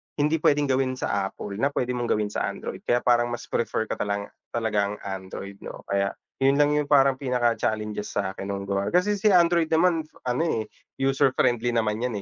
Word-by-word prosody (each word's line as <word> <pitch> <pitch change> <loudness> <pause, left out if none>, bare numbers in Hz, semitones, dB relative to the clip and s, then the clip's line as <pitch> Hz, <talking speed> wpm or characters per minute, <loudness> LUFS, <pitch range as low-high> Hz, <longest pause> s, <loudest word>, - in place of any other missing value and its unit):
hindi 150 +2 +1
puwedeng 145 -1 +2
gawin 130 0 +1
sa 100 -5 -1
Apple 100 +1 -7
na 140 - +3
puwede 125 -2 -1
mong 120 -1 -2
gawin 105 -2 0
sa - - -1
Android - - -6
kaya 120 0 +2
parang 120 -1 +3
mas 120 0 -6
prefer 115 - 0
ko 110 - -5
talanga 100 0 -2 0.2
talaga 105 -3 0
ang - - -5
Android, 95 0 -6
'no? - - -9
Kaya 100 0 0 0.3
yun 135 +1 +4
lang 145 0 +4
yung 150 -1 0
parang 135 -2 +5
pinaka-challenges 115 -5 -1
sa'kin 95 -1 -3
nung 100 0 -4
gawa 100 0 -1
kasi 180 +4 +2
si 205 +1 +3
Android 170 -2 +4
naman, 165 0 +3 0.2
ano 125 +6 +1
eh, 115 -10 -1 0.3
user 135 0 +3
friendly 120 0 +2
naman 110 -1 +1
'yan 125 -1 -1
120 Hz, 195 wpm, -25 LUFS, 105-145 Hz, 0.3 s, parang